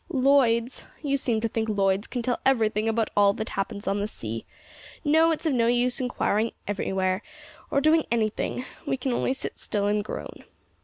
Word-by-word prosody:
"Lloyd's? 260 -4 +3 0.2
You 280 -1 +1
seem 235 -5 0
to 230 - +1
think 225 0 -2
Lloyd's 195 0 +1
can 245 -2 -3
tell 245 0 0
everything 225 -4 +2
about 225 0 0
all 200 -1 +5
that 220 +2 -4
happens 200 +1 -4
on 200 +1 +1
the 205 - -1
sea. 115 - -6 0.6
No, 320 +3 +5
it's 325 0 -1
of 310 - +2
no 230 -2 +3
use 245 +2 +1
inquiring 230 -3 0
anywhere, 190 -1 0 0.5
or 280 - +2
doing 310 +2 +4
anything. 230 +2 -1 0.2
We 265 - 0
can 255 0 -1
only 260 +2 0
sit - - -6
still 205 -1 -2
and 205 0 +1
groan." - - -7
230 Hz, 185 wpm, -26 LUFS, 205-260 Hz, 0.6 s, all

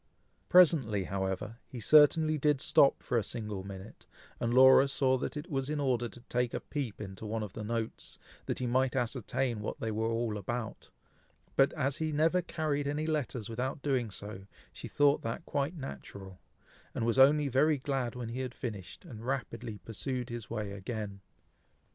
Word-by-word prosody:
Presently, 145 - +5
however, 95 +4 -3
he 125 - -8
certainly 155 +4 +5
did 150 -1 +2
stop 135 +1 +4
for 120 - +1
a - - -2
single 105 -5 -4
minute, 100 +2 -10 0.3
and 120 - 0
Laura 130 +2 +7
saw 135 -1 +2
that 150 - -4
it 150 - -6
was 135 -1 -1
in 150 0 -1
order 125 -4 0
to 120 - -11
take 125 0 -1
a - - -1
peep 135 -8 -5
into 95 -1 -7
one 110 +1 -2
of 100 -3 -7
the 110 - -6
notes, 115 +1 -4 0.3
that - - -1
he 125 - -2
might 130 +2 +1
ascertain 125 -1 -1
what 105 - -5
they 110 - -2
were 110 +1 -1
all 115 -2 -1
about; 110 +3 -5 0.7
but 135 0 +5
as 140 -1 -1
he 155 0 -1
never 160 +4 +2
carried 155 -4 -2
any 150 +2 -1
letters 135 -8 -2
without 130 +4 -3
doing 130 -5 0
so, 100 -1 -7 0.3
she - - -8
thought 145 0 +3
that 115 +8 -4
quite 145 +5 -1
natural, 100 - -8 0.6
and 115 - -1
was 120 +3 +1
only 145 +2 +6
very 145 +4 +3
glad 130 -3 -2
when 120 -2 -5
he 120 +3 -5
had 130 -2 -4
finished, 105 -7 -7
and 110 -2 -9
rapidly 115 -5 -3
pursued 125 +2 -3
his 120 -3 -6
way 105 -3 -3
again. 100 0 -5
125 Hz, 180 wpm, -31 LUFS, 110-140 Hz, 0.7 s, Laura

